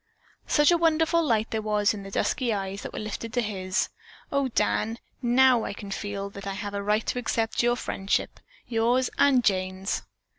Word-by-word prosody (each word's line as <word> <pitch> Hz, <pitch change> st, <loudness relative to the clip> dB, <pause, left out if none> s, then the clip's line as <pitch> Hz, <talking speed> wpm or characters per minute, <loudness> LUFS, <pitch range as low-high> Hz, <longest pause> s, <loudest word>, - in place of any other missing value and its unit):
Such 295 Hz, +3 st, +4 dB
a 345 Hz, -, +3 dB
wonderful 325 Hz, 0 st, +3 dB
light 225 Hz, -7 st, +1 dB
there 220 Hz, -, -1 dB
was 210 Hz, -1 st, +2 dB
in 205 Hz, -, -6 dB
the 195 Hz, -, -8 dB
dusky 240 Hz, +4 st, 0 dB
eyes 195 Hz, -1 st, -3 dB
that -, -, -6 dB
were -, -, -8 dB
lifted 215 Hz, +1 st, -5 dB
to 245 Hz, -, +2 dB
his. 185 Hz, -3 st, -1 dB, 0.4 s
"O, 280 Hz, -1 st, +1 dB
Dan, 225 Hz, -2 st, 0 dB, 0.2 s
now 250 Hz, -1 st, +4 dB
I -, -, -3 dB
can 200 Hz, 0 st, -8 dB
feel 200 Hz, 0 st, -4 dB
that 200 Hz, 0 st, -8 dB
I 195 Hz, -, -2 dB
have 205 Hz, +1 st, -5 dB
a 200 Hz, -, -2 dB
right 210 Hz, +2 st, +1 dB
to 250 Hz, -, -1 dB
accept 225 Hz, -2 st, 0 dB
your 240 Hz, 0 st, +3 dB
friendship; 195 Hz, -5 st, -2 dB, 0.3 s
yours 240 Hz, +2 st, +2 dB
and 265 Hz, -3 st, +5 dB
Jane's." 190 Hz, -1 st, 0 dB
220 Hz, 190 wpm, -26 LUFS, 200-250 Hz, 0.4 s, and